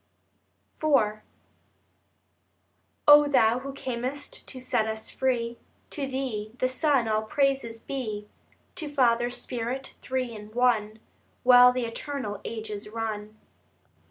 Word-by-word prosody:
IV 225 -9 +3 1.9
O 295 0 +9
Thou 240 -4 +4
who 275 +1 -6
cam'st 260 +2 -5
to 260 - -7
set 245 -3 0
us 220 0 -4
free, 240 -3 -1 0.3
To 285 -4 -3
Thee, 250 -6 -3
the 255 - +1
Son, 260 -2 +2
all 215 0 +1
praises 240 0 0
be; 220 -5 -5 0.5
To 310 -3 -3
Father, 240 -4 +3
Spirit, 245 +1 -4
Three 255 -2 -2
in 210 -1 -9
One, 225 -3 +2 0.5
While 250 0 +8
the 250 -1 -2
eternal 230 -3 -5
ages 215 -2 -6
run. 215 -1 -5
245 Hz, 115 wpm, -27 LUFS, 220-265 Hz, 1.9 s, O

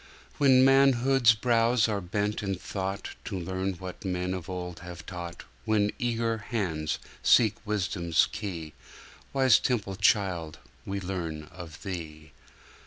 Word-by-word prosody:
When 130 -2 +6
manhood's 135 -3 +5
brows 115 0 +3
are 105 -2 -1
bent 105 +4 -2
in 100 -2 -1
thought, 95 +2 -4
To 100 - -4
learn 95 +2 -2
what 90 +1 -8
men 90 -1 -2
of 90 -2 -6
old 90 -2 -5
have 85 -1 -9
taught, 85 -2 -7 0.2
When 105 -1 +2
eager 115 -2 0
hands 90 -9 -2 0.2
seek 110 -4 +5
wisdom's 90 -5 +1
key, 85 -7 -5 0.6
Wise 130 -4 +5
Temple 100 -6 -1
Child, 90 -6 +1 0.3
We 100 0 -2
learn 85 -5 -4
of 85 -3 -10
Thee! 80 -5 -7
95 Hz, 130 wpm, -28 LUFS, 90-115 Hz, 0.6 s, When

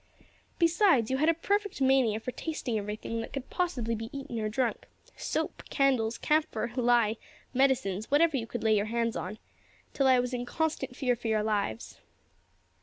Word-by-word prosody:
"Besides, 335 - +3
you 265 - +1
had 310 +4 +3
a - - +5
perfect 405 +3 -1
mania 260 -5 +3
for 250 - -5
tasting 295 -5 -4
everything 215 +2 -3
that 225 - -8
could 275 -1 -6
possibly 265 -11 -1
be 225 0 -4
eaten 275 -4 -5
or 215 -1 -1
drunk 235 +2 -1 0.3
soap, - - -3
candles, 255 -5 +2
camphor, 295 -7 0
lye, 240 -3 +3 0.4
medicines 250 -7 +1
whatever 310 +2 +4
you 230 -4 -2
could 240 - -5
lay 220 -1 +4
your 205 0 +1
hands 230 0 -1
on 210 +4 -4 0.6
till 275 - +2
I 260 -1 +6
was 250 +1 -2
in 245 -1 -2
constant 315 -1 -2
fear 250 -3 +1
for 230 - -6
your 215 -1 +1
lives." 205 - -2
245 Hz, 175 wpm, -29 LUFS, 220-275 Hz, 0.6 s, I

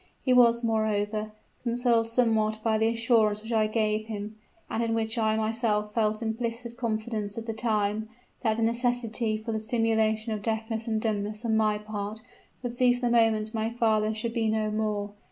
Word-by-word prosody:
He 255 - +4
was 235 -1 +5
moreover 215 -1 0 0.3
consoled 235 -1 +1
somewhat 225 -2 +2
by 220 -1 +2
the 220 - +3
assurance 225 -2 +2
which 225 +1 -4
I 215 -1 +3
gave 215 0 0
him, 210 -1 -5 0.3
and 225 - -2
in 225 -1 0
which 220 0 -1
I 220 -1 +2
myself 215 -1 0
felt 215 0 +1
implicit 235 +1 -3
confidence 220 -3 -3
at 225 - -4
the 225 - -3
time, 215 -1 -1 0.3
that 220 -3 +1
the 225 - 0
necessity 235 -1 0
for 220 +1 -5
the 220 - -1
simulation 220 0 +1
of 210 - -4
deafness 220 +1 -2
and 220 -1 0
dumbness 215 0 -2
on 220 -1 +2
my 215 -1 +2
part 210 +1 -6 0.4
would 245 -1 -3
cease 245 0 +3
the 245 -1 0
moment 220 -2 +3
my 220 0 -1
father 220 -2 +1
should 225 +1 -3
be 225 -2 +1
no 215 -1 0
more. 210 -1 -2
220 Hz, 180 wpm, -27 LUFS, 215-230 Hz, 0.4 s, was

